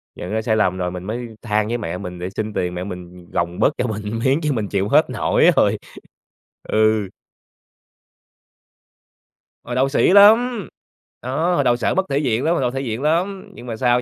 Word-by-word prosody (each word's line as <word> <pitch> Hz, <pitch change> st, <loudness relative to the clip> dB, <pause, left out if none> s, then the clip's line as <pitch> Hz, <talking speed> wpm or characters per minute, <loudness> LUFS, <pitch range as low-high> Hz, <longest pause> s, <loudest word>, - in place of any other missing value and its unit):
nhận 90 Hz, -, -7 dB
ra 110 Hz, +1 st, 0 dB
sai 110 Hz, 0 st, 0 dB
lầm, 95 Hz, -3 st, +1 dB
rồi 90 Hz, -1 st, -2 dB
mình 90 Hz, 0 st, -7 dB
mới 115 Hz, +2 st, -5 dB
than 105 Hz, -2 st, 0 dB
với 120 Hz, +2 st, -1 dB
mẹ 90 Hz, -4 st, -4 dB
mình, 90 Hz, -2 st, -7 dB
để 90 Hz, +1 st, -4 dB
xin 110 Hz, +2 st, -4 dB
tiền 90 Hz, -2 st, -2 dB
mẹ 90 Hz, -, -4 dB
mình 90 Hz, -2 st, -9 dB
gồng 85 Hz, +1 st, -2 dB
bớt 145 Hz, -, +3 dB
cho 125 Hz, -, -1 dB
mình 110 Hz, +1 st, -4 dB
miếng 135 Hz, +3 st, +3 dB
chứ 150 Hz, -, +1 dB
mình 110 Hz, -4 st, -2 dB
chịu 100 Hz, 0 st, 0 dB
hết 150 Hz, +5 st, +4 dB
nổi -, -, +3 dB
rồi. -, -, +3 dB, 0.9 s
Ừ. 110 Hz, -1 st, +2 dB, 2.6 s
Hồi 120 Hz, -, -5 dB
đầu 135 Hz, +2 st, +2 dB
sĩ 145 Hz, -, +3 dB
lắm. 220 Hz, +2 st, +5 dB, 0.5 s
Đó, 160 Hz, +8 st, 0 dB
hồi 145 Hz, -, +2 dB
đầu 120 Hz, -2 st, +3 dB
sợ 120 Hz, -, 0 dB
mất 190 Hz, +1 st, +1 dB
thể 140 Hz, -, 0 dB
diện 130 Hz, -4 st, 0 dB
lắm, 165 Hz, -, +2 dB
hồi 170 Hz, -, 0 dB
đầu 125 Hz, -1 st, 0 dB
thể 135 Hz, -, -3 dB
diện 115 Hz, -2 st, -4 dB
lắm 180 Hz, +6 st, -1 dB
nhưng -, -, -12 dB
mà 115 Hz, -, -4 dB
sau 125 Hz, +1 st, +2 dB
115 Hz, 205 wpm, -20 LUFS, 100-140 Hz, 2.6 s, lắm